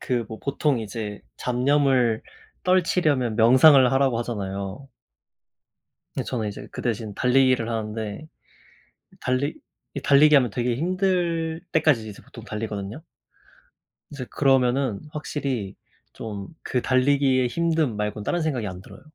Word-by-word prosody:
그 120 Hz, -2 st, -1 dB
뭐 110 Hz, -, -7 dB
보통 140 Hz, -2 st, 0 dB
이제 105 Hz, -1 st, -6 dB, 0.2 s
잡념을 125 Hz, -2 st, +2 dB, 0.4 s
떨치려면 155 Hz, -10 st, +2 dB
명상을 130 Hz, +3 st, +7 dB
하라고 135 Hz, -3 st, +2 dB
하잖아요. 100 Hz, +1 st, -5 dB, 1.3 s
근데 -, -, -2 dB
저는 110 Hz, -4 st, -2 dB
이제 100 Hz, -, -8 dB
그 -, -, -6 dB
대신 110 Hz, -3 st, -3 dB
달리기를 130 Hz, -1 st, +3 dB
하는데 110 Hz, +3 st, -4 dB, 0.9 s
달리 130 Hz, +4 st, -1 dB, 0.4 s
이 140 Hz, -, -3 dB
달리기 145 Hz, +2 st, +5 dB
하면 125 Hz, -4 st, +5 dB
되게 120 Hz, +2 st, -1 dB
힘들 170 Hz, -1 st, 0 dB
때까지 155 Hz, -8 st, +3 dB
계속 105 Hz, -2 st, -10 dB
보통 115 Hz, -, -12 dB
달리거든요. 105 Hz, +2 st, -5 dB, 1.1 s
이제 140 Hz, -4 st, -6 dB
그러면은 130 Hz, -4 st, +2 dB
확실히 135 Hz, -9 st, -4 dB, 0.4 s
좀 105 Hz, -3 st, -7 dB
그 125 Hz, -, -1 dB
달리기의 130 Hz, -1 st, +2 dB
힘듦 165 Hz, -1 st, +1 dB
말곤 105 Hz, 0 st, -3 dB
다른 175 Hz, -, 0 dB
생각이 135 Hz, -9 st, -1 dB
안 90 Hz, -2 st, -6 dB
들어요. -, -, -14 dB
125 Hz, 285 characters per minute, -24 LUFS, 110-145 Hz, 1.3 s, 명상을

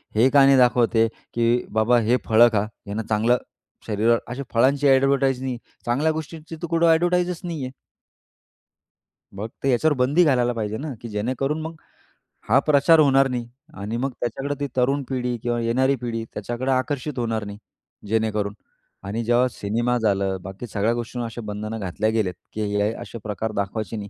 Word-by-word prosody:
हे 115 Hz, +5 st, +5 dB
का 140 Hz, 0 st, +6 dB
नाही 135 Hz, 0 st, +6 dB
दाखवत 120 Hz, -2 st, +3 dB
आहे, 115 Hz, 0 st, +5 dB, 0.3 s
की 120 Hz, +1 st, +1 dB
बाबा 120 Hz, +2 st, +4 dB
हे 125 Hz, +2 st, +4 dB
फळं 115 Hz, +2 st, +6 dB
खा. 100 Hz, -, +3 dB, 0.2 s
ह्यांना 105 Hz, +2 st, -4 dB
चांगलं 115 Hz, +3 st, +3 dB, 0.5 s
शरीरावर 115 Hz, +2 st, +2 dB
अशा 125 Hz, +3 st, -5 dB
फळांची 135 Hz, +4 st, +3 dB
ॲडव्हरटाईज 135 Hz, -1 st, +3 dB
नाही. 130 Hz, -2 st, -3 dB, 0.3 s
चांगल्या 140 Hz, +7 st, +1 dB
गोष्टींची 160 Hz, +1 st, -7 dB
तर 165 Hz, +2 st, -6 dB
कुठं 165 Hz, 0 st, +2 dB
ॲडव्हरटाईजच 175 Hz, +1 st, +2 dB
नाही 165 Hz, -5 st, -4 dB
आहे. 130 Hz, -, -6 dB, 1.7 s
मग 110 Hz, +3 st, -4 dB
ते 135 Hz, -, +2 dB
याच्यावर 145 Hz, +5 st, +3 dB
बंदी 140 Hz, +8 st, +3 dB
घालायला 125 Hz, -4 st, +2 dB
पाहिजे 110 Hz, -2 st, -3 dB
ना, 150 Hz, 0 st, -5 dB
की 120 Hz, -, -6 dB
जेणेकरून 130 Hz, +8 st, -2 dB
मग 160 Hz, +1 st, -6 dB, 0.8 s
हा 135 Hz, -, +6 dB
प्रचार 150 Hz, +3 st, +4 dB
होणार 135 Hz, -2 st, +5 dB
नाही 120 Hz, -2 st, -3 dB, 0.3 s
आणि 110 Hz, +4 st, -3 dB
मग 135 Hz, +2 st, -1 dB
त्याच्याकडे 135 Hz, +4 st, -3 dB
ती 145 Hz, -, -1 dB
तरुण 135 Hz, +3 st, +2 dB
पिढी 125 Hz, -2 st, -2 dB
किंवा 120 Hz, 0 st, 0 dB
येणारी 130 Hz, +4 st, +2 dB
पिढी 115 Hz, -2 st, -3 dB
त्याच्याकडे 120 Hz, +5 st, -3 dB
आकर्षित 130 Hz, +1 st, -1 dB
होणार 115 Hz, -2 st, -1 dB
नाही 100 Hz, 0 st, -7 dB, 0.5 s
जेणेकरून 105 Hz, -1 st, 0 dB, 0.5 s
आणि 110 Hz, +4 st, -3 dB
जेव्हा 120 Hz, +2 st, +3 dB
सिनेमा 120 Hz, +5 st, -1 dB
झालं, 100 Hz, -3 st, 0 dB
बाकी 95 Hz, +6 st, -8 dB
सगळ्या 105 Hz, +1 st, 0 dB
गोष्टींवर 120 Hz, +1 st, -4 dB
अशा 115 Hz, +1 st, -6 dB
बंधनं 105 Hz, +2 st, -5 dB
घातल्या 100 Hz, +3 st, -1 dB
गेले 110 Hz, -4 st, +1 dB
आहेत, 90 Hz, -, -9 dB, 0.2 s
की 110 Hz, -, -4 dB
हे 105 Hz, +1 st, +2 dB
असे -, -, -8 dB
प्रकार 110 Hz, +1 st, -3 dB
दाखवायचे 100 Hz, +1 st, -3 dB
नाही. 100 Hz, -1 st, -6 dB
120 Hz, 175 wpm, -23 LUFS, 110-135 Hz, 1.7 s, का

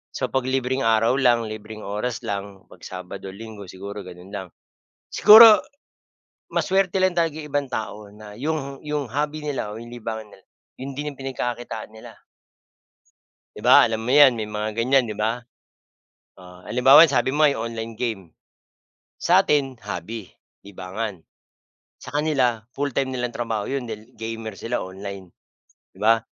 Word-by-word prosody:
So -, -, -2 dB
pag 130 Hz, -1 st, 0 dB
libreng 130 Hz, 0 st, 0 dB
araw 115 Hz, +2 st, +3 dB
lang, 120 Hz, -3 st, +4 dB
libreng 110 Hz, 0 st, -8 dB
oras 105 Hz, +4 st, -3 dB
lang, 100 Hz, -1 st, -5 dB
'pag -, -, -16 dB
Sabado 90 Hz, +1 st, -8 dB
Linggo 105 Hz, 0 st, -10 dB
siguro 100 Hz, +2 st, -8 dB
ganun 90 Hz, +2 st, -12 dB
lang. 95 Hz, -2 st, -5 dB, 0.6 s
Siguro 220 Hz, +3 st, +9 dB, 0.9 s
mas -, -, 0 dB
swerte 190 Hz, -1 st, +2 dB
lang 185 Hz, -1 st, +2 dB
talaga 165 Hz, -3 st, +1 dB
yung 150 Hz, -, -9 dB
ibang 145 Hz, 0 st, 0 dB
tao 110 Hz, -1 st, -4 dB, 0.2 s
na 105 Hz, -1 st, -12 dB
'yong 140 Hz, -1 st, -4 dB
yung 150 Hz, -4 st, -2 dB
hobby 150 Hz, +3 st, -2 dB
nila 135 Hz, -8 st, -3 dB
o 110 Hz, -, -8 dB
'yong 120 Hz, 0 st, -10 dB
libangan 110 Hz, -2 st, -6 dB
nila, 95 Hz, -, -18 dB, 0.4 s
'yun 135 Hz, +2 st, -6 dB
din 145 Hz, +2 st, -4 dB
yung 140 Hz, -, -14 dB
pinagkakakitaan 120 Hz, -4 st, -5 dB
nila. 110 Hz, -, -11 dB, 1.4 s
'Di -, -, -9 dB
ba, -, -, +7 dB
alam 110 Hz, -1 st, -2 dB
mo 115 Hz, -, -4 dB
'yan, 140 Hz, -2 st, +7 dB
may 110 Hz, -2 st, -5 dB
mga 105 Hz, 0 st, -3 dB
ganyan, 125 Hz, +3 st, +2 dB
'di 110 Hz, -, -5 dB
ba? 110 Hz, +3 st, -1 dB, 1.0 s
Oh, 90 Hz, -1 st, -15 dB
halimbawa 125 Hz, +8 st, +7 dB
yung 140 Hz, -, -3 dB
sabi 130 Hz, -, +2 dB
mo 150 Hz, +2 st, +4 dB
'yong 140 Hz, -6 st, 0 dB
online 115 Hz, 0 st, -6 dB
game. 110 Hz, -4 st, -3 dB, 1.0 s
Sa'tin 135 Hz, -3 st, +3 dB
hobby, 105 Hz, +3 st, -5 dB, 0.4 s
libangan, 95 Hz, 0 st, -6 dB, 0.7 s
sa -, -, -11 dB
kanila 140 Hz, -6 st, +1 dB, 0.2 s
full-time 135 Hz, -2 st, -1 dB
nilang 125 Hz, -1 st, -2 dB
trabaho 115 Hz, -2 st, -3 dB
'yon 135 Hz, -3 st, -3 dB
dahil 110 Hz, +2 st, -8 dB
gamer 110 Hz, -2 st, -6 dB
sila 115 Hz, -2 st, -2 dB
online, 95 Hz, -1 st, -8 dB, 0.6 s
di -, -, -17 dB
ba? 115 Hz, +1 st, +5 dB
115 Hz, 155 wpm, -23 LUFS, 105-135 Hz, 1.4 s, Siguro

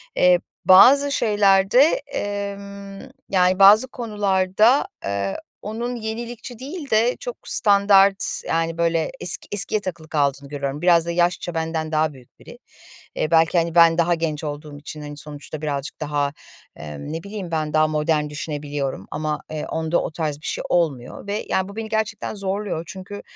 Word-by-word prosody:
eee, 180 Hz, -1 st, +5 dB, 0.3 s
bazı 275 Hz, +10 st, +7 dB
şeylerde, 205 Hz, -1 st, +3 dB, 0.3 s
emm, 200 Hz, -3 st, -6 dB, 0.3 s
yani 185 Hz, 0 st, +2 dB
bazı 205 Hz, +5 st, +7 dB
konularda, 210 Hz, 0 st, +1 dB, 0.2 s
eee, 100 Hz, -1 st, -2 dB, 0.2 s
onun 235 Hz, +4 st, -4 dB
yenilikçi 235 Hz, +1 st, -6 dB
değil 285 Hz, +3 st, -7 dB
de 225 Hz, +3 st, +2 dB
çok -, -, -6 dB
standart 200 Hz, -1 st, +4 dB, 0.2 s
yani 165 Hz, 0 st, -1 dB
böyle 165 Hz, -1 st, 0 dB
eski -, -, 0 dB
eskiye 205 Hz, +1 st, -1 dB
takılı 165 Hz, -5 st, -6 dB
kaldığını 140 Hz, -2 st, -1 dB
görüyorum. 140 Hz, 0 st, -4 dB
Biraz 170 Hz, -2 st, +4 dB
da 170 Hz, -, -2 dB
yaşça 175 Hz, 0 st, 0 dB
benden 160 Hz, -1 st, -3 dB
daha 155 Hz, -1 st, +1 dB
büyük 130 Hz, -3 st, -19 dB
biri. -, -, -13 dB, 0.6 s
Eee, 155 Hz, -, -2 dB
belki, 165 Hz, +1 st, +4 dB
hani, 170 Hz, 0 st, 0 dB
ben 165 Hz, -1 st, +6 dB
daha 175 Hz, 0 st, +3 dB
genç 160 Hz, -2 st, -2 dB
olduğum 150 Hz, 0 st, -6 dB
için, 150 Hz, +1 st, -9 dB
hani, 145 Hz, 0 st, -8 dB
sonuçta 150 Hz, 0 st, -6 dB
birazcık 145 Hz, -1 st, -4 dB
daha, 145 Hz, -1 st, -1 dB, 0.4 s
emm, 75 Hz, -, -8 dB
ne 165 Hz, +1 st, -5 dB
bileyim 200 Hz, -4 st, -7 dB
ben 155 Hz, -2 st, -2 dB
daha 155 Hz, 0 st, +4 dB
modern 150 Hz, 0 st, 0 dB
düşünebiliyorum. 145 Hz, -, -4 dB
Ama, 155 Hz, -1 st, -3 dB
eee, 155 Hz, -1 st, -4 dB
onda 160 Hz, +1 st, -1 dB
o -, -, -4 dB
tarz 155 Hz, -2 st, -3 dB
bir -, -, -11 dB
şey -, -, -3 dB
olmuyor 155 Hz, -2 st, -1 dB
ve, 205 Hz, +2 st, -3 dB
ya, 190 Hz, +1 st, 0 dB
bu 200 Hz, -, -11 dB
beni 220 Hz, 0 st, -5 dB
gerçekten 220 Hz, -1 st, -2 dB
zorluyor. 195 Hz, -3 st, -3 dB
Çünkü, 195 Hz, +1 st, -8 dB
170 Hz, 160 wpm, -22 LUFS, 155-205 Hz, 0.6 s, bazı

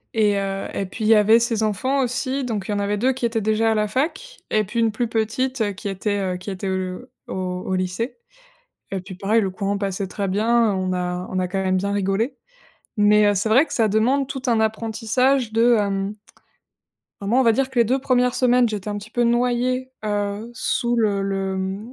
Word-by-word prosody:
Et, 210 Hz, -2 st, +3 dB
heu, 195 Hz, 0 st, -3 dB
et 195 Hz, -, -2 dB
puis 215 Hz, +3 st, -5 dB
il -, -, +2 dB
y 225 Hz, -, +8 dB
avait 220 Hz, +2 st, +6 dB
ses 230 Hz, -2 st, 0 dB
enfants, 260 Hz, +6 st, 0 dB
aussi, 260 Hz, +2 st, -1 dB
donc 215 Hz, -6 st, -3 dB
il -, -, -2 dB
y -, -, 0 dB
en 205 Hz, -, -1 dB
avait 205 Hz, +1 st, 0 dB
2 260 Hz, +5 st, +2 dB
qui 250 Hz, -2 st, -1 dB
étaient 225 Hz, -1 st, -2 dB
déjà 220 Hz, +1 st, +2 dB
à -, -, -2 dB
la 210 Hz, 0 st, +1 dB
fac 315 Hz, -, -2 dB
et 215 Hz, 0 st, +2 dB
puis 230 Hz, +4 st, -4 dB
une 225 Hz, -1 st, +3 dB
plus 235 Hz, +3 st, -1 dB
petite 225 Hz, 0 st, -1 dB
qui 205 Hz, +2 st, -6 dB
était, 205 Hz, +1 st, -2 dB, 0.2 s
heu, 180 Hz, -, -4 dB
qui 185 Hz, -, -8 dB
était, 190 Hz, 0 st, -5 dB
heu, 185 Hz, +5 st, -4 dB, 0.2 s
au -, -, -5 dB, 0.3 s
au 190 Hz, -, 0 dB
lycée. 185 Hz, -, -3 dB, 0.7 s
Et 195 Hz, -, -2 dB
puis 185 Hz, +1 st, -10 dB
pareil, 205 Hz, +5 st, +1 dB
le 195 Hz, -, -1 dB
courant 200 Hz, +2 st, -2 dB
passait 195 Hz, -1 st, -3 dB
très 200 Hz, +1 st, -3 dB
bien, 220 Hz, +2 st, +2 dB
on 185 Hz, -1 st, -1 dB
a 180 Hz, 0 st, -3 dB
on 185 Hz, -, -2 dB
a 185 Hz, -, +1 dB
quand 190 Hz, +1 st, -2 dB
même 185 Hz, 0 st, +1 dB
bien 200 Hz, +2 st, -1 dB
rigolé. 205 Hz, +6 st, 0 dB, 0.6 s
Mais, 210 Hz, 0 st, +5 dB
heu, -, -, +1 dB
c'est 200 Hz, +4 st, 0 dB
vrai 260 Hz, +8 st, +5 dB
que -, -, -10 dB
ça 225 Hz, -, +2 dB
demande 245 Hz, +6 st, +2 dB
tout 265 Hz, -1 st, -6 dB
un 230 Hz, -2 st, +3 dB
apprentissage 225 Hz, +3 st, +1 dB
de, 230 Hz, +1 st, +4 dB
hem 200 Hz, 0 st, -1 dB, 1.1 s
bah, 200 Hz, -, -6 dB
moi, 240 Hz, +6 st, +3 dB
on -, -, +5 dB
va 230 Hz, -2 st, +5 dB
dire 270 Hz, +3 st, 0 dB
que 260 Hz, -, -3 dB
les 235 Hz, -, +6 dB
2 255 Hz, +4 st, +1 dB
1res 250 Hz, -1 st, +1 dB
semaines 250 Hz, -1 st, +3 dB
j'étais 210 Hz, -2 st, -5 dB
un 205 Hz, -, -3 dB
petit 205 Hz, +1 st, -11 dB
peu 240 Hz, +1 st, 0 dB
noyée, 250 Hz, +2 st, +1 dB
heu, 205 Hz, +1 st, -2 dB
sous 240 Hz, 0 st, -1 dB
le 205 Hz, -4 st, +1 dB
le 190 Hz, -1 st, -2 dB
215 Hz, 225 wpm, -22 LUFS, 195-240 Hz, 1.1 s, y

